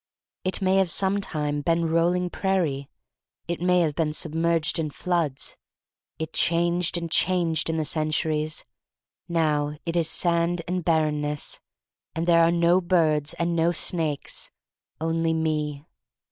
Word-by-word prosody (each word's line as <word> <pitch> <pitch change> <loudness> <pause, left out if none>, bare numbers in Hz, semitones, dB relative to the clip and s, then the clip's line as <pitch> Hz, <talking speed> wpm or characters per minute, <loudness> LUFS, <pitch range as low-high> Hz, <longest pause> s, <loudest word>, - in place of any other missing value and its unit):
It 185 +1 -1
may 190 +1 +3
have 190 -2 +3
sometime 155 -6 0
been 165 +2 +1
rolling 175 +2 +1
prairie. 160 -8 -1 0.6
It 170 0 -3
may 180 0 +3
have 155 -3 +1
been 150 0 -1
submerged 165 +1 0
in 155 -2 -1
floods. 160 -3 -2 0.6
It 160 - -5
changed 170 +1 +1
and 170 -1 -4
changed 170 -4 +1
in 160 - -1
the 155 - -1
centuries. 155 0 -1 0.6
Now 150 -3 0
it 170 0 -3
is 165 -2 +2
sand 170 0 +2
and 180 0 -2
barrenness, 150 -2 0 0.6
and 165 +1 -1
there 170 -1 +5
are 165 - +5
no 170 +2 +3
birds 160 -5 +1
and 170 0 -1
no 165 +1 +2
snakes; 160 -3 -1 0.5
only 165 0 0
me. 150 -2 -2
165 Hz, 135 wpm, -25 LUFS, 155-175 Hz, 0.6 s, there